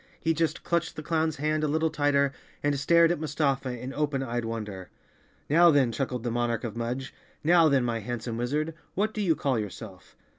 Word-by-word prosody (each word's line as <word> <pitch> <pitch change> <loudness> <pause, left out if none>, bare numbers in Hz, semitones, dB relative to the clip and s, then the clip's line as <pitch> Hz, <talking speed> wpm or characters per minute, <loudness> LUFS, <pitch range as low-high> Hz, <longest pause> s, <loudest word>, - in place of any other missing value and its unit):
He 165 - +1
just 165 0 -1
clutched 170 -1 -1
the 155 - -6
clown's 160 -1 0
hand 155 +2 0
a - - +2
little 160 +2 +1
tighter 145 -2 +2 0.3
and 145 -1 +1
stared 170 +4 +5
at 175 - -1
Mustafa 140 -5 -1
in 130 +3 -6
open 145 -2 -1
eyed 120 -2 -2
wonder. 105 -5 -5 0.6
"Now 170 +4 +6
then," 140 -6 +4
chuckled 125 0 -3
the 120 - -1
monarch 120 0 -1
of 115 -3 -4
Mudge, 125 +3 -4 0.3
"now 165 0 +5
then, 135 -3 +3
my 115 -1 -1
handsome 115 +1 -4
wizard, 150 +7 -1 0.2
what 215 +3 0
do 215 - -2
you 170 -5 +2
call 135 -6 0
yourself?" 100 -2 -8
140 Hz, 195 wpm, -27 LUFS, 120-155 Hz, 0.6 s, Now